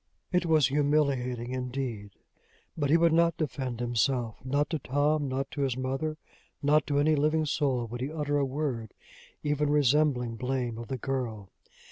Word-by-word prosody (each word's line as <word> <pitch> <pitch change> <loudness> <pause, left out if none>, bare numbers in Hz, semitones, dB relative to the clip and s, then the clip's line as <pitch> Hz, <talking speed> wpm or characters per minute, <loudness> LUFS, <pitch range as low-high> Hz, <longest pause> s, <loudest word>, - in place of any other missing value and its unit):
It 180 -2 +1
was 155 -5 +4
humiliating, 135 -4 +1
indeed! 125 -5 -4 0.7
But 145 -3 -1
he 160 - +6
would 170 -1 +4
not 170 0 +3
defend 130 -6 -3
himself. 120 0 0
Not 145 +3 +1
to 160 - -1
Tom, 145 +3 +1
not 135 +1 -3
to 145 - -4
his 130 -3 0
mother, 135 +4 -2 0.5
not 150 +1 +3
to 145 - 0
any 155 +2 +4
living 155 +2 +2
soul, 135 -5 0
would 120 +2 -6
he 135 +3 -2
utter 145 -2 0
a - - +2
word 130 -5 -3 0.5
even 150 0 +1
resembling 140 -4 +2
blame 125 -2 -2
of 115 - -7
the 130 - -3
girl! 115 -6 -4
135 Hz, 165 wpm, -29 LUFS, 125-150 Hz, 0.7 s, he